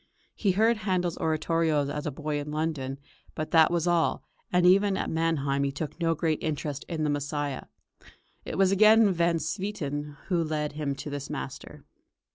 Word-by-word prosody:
He 200 -4 +1
heard 225 +4 +3
Handel's 185 -5 -1
oratorios 160 -2 +1
as 150 +1 -4
a - - -1
boy 150 +1 -3
in 145 +1 -6
London, 150 -3 -2 0.4
but 155 - -4
that 160 -1 +6
was 170 -1 0
all, 175 -2 +1 0.3
and 180 0 +3
even 195 +2 +5
at - - -2
Mannheim 145 -4 0
he 140 - 0
took 150 +3 -6
no 165 -1 +1
great 160 -1 -1
interest 150 -2 -3
in 160 -3 -2
the 150 - +1
"Messiah." 145 -1 -3 0.8
It - - -5
was 195 -1 +4
again 215 +1 +6
Van 170 -1 +2
Swieten 150 -7 -4
who 175 -3 +2
led 150 -1 -2
him 145 -2 -3
to 145 +2 -7
this 145 -1 -5
master. - - -7
160 Hz, 175 wpm, -27 LUFS, 145-175 Hz, 0.8 s, that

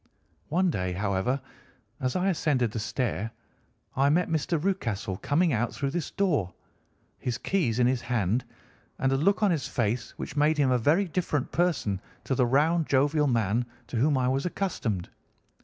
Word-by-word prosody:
One 180 +3 +2
day, 90 - -2
however, 100 +7 0 0.6
as 130 -2 -1
I 185 +1 +2
ascended 140 - +1
the 115 - -3
stair, 110 -1 -2 0.7
I 135 +2 +3
met 175 +5 +2
Mr. 160 +1 0
Rucastle 115 - -2
coming 160 - +1
out 120 +1 -1
through 140 -1 -2
this 170 0 -2
door, 150 - 0 0.6
his 125 - -2
keys 160 - 0
in 125 - +4
his 125 0 +1
hand, 115 0 0 0.5
and 135 - +1
a - - +3
look 200 +10 +2
on 205 - +4
his 160 -5 -1
face 115 0 -2
which - - -6
made 150 +1 +3
him 140 -3 +3
a 125 - +3
very 160 - +3
different 165 -6 -1
person 140 - 0 0.2
to - - -1
the 125 -2 +2
round, 155 +5 +2
jovial 145 +2 +3
man 115 -2 +1 0.3
to 120 - -3
whom 140 +4 +3
I 125 -1 +1
was 135 +2 +1
accustomed. 150 - -2
135 Hz, 175 wpm, -27 LUFS, 115-160 Hz, 0.7 s, in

